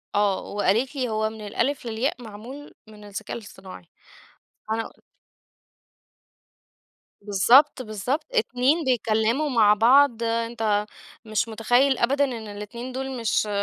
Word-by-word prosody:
آه 205 -2 +2
وقالت 220 +7 0
لي: 255 -3 -2
"هو 215 0 0
من 220 -1 -11
الألف 255 +5 -1
للياء 240 +2 -2
معمول 235 +7 -10
من 210 -1 -14
الذكاء 205 +3 -6
الاصطناعي"، 190 -4 -12 0.8
أنا 225 0 -1
قل - - -25 2.2
بالضبط 245 +8 +4
بالضبط، 220 +7 -3
2 305 - +1
بيتكلموا 235 +3 +1
مع 215 -5 +4
بعض، 240 +2 +4
أنت 230 -2 -1 0.4
مش 215 +1 -1
مُتخيّل 245 +5 +2
أبدًا 275 +4 +2
إن 260 - -3 0.2
الاتنين 235 +5 -7
دول 265 0 -5
مش 220 -1 0
230 Hz, 120 wpm, -24 LUFS, 215-260 Hz, 2.2 s, بالضبط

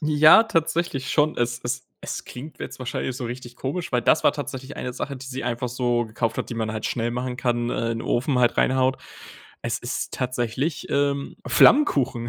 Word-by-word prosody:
Ja, 155 +6 +7
tatsächlich 165 -7 -1
schon. 150 0 +2
Es 120 0 -1
es 120 - -3
es - - -5
klingt 145 +5 -9
jetzt - - -6
wahrscheinlich 130 0 -3
so 130 - -5
richtig 120 0 -7
komisch, 160 +6 -3
weil 125 -2 +1
das 155 - +4
war - - +5
tatsächlich 135 -1 -6
eine 125 - -4
Sache, 140 +2 -4
die 130 +1 -9
sie 130 0 -5
einfach 120 +1 -2
so 120 -1 0
gekauft 115 +1 -2
hat, - - -3
die 120 - -3
man 110 -1 -2
halt 110 - -3
schnell 120 -1 -1
machen 125 +1 -3
kann, 120 -2 0
äh, 115 0 -1
in 115 0 -3
Ofen 130 +1 +1
halt 120 -1 +3
reinhaut. 130 0 +2 0.6
Es - - -1
ist - - -4
tatsächlich, 125 +4 -2
ähm, 140 0 0
Flammkuchen. 130 - +4
125 Hz, 195 wpm, -24 LUFS, 120-140 Hz, 0.6 s, Ja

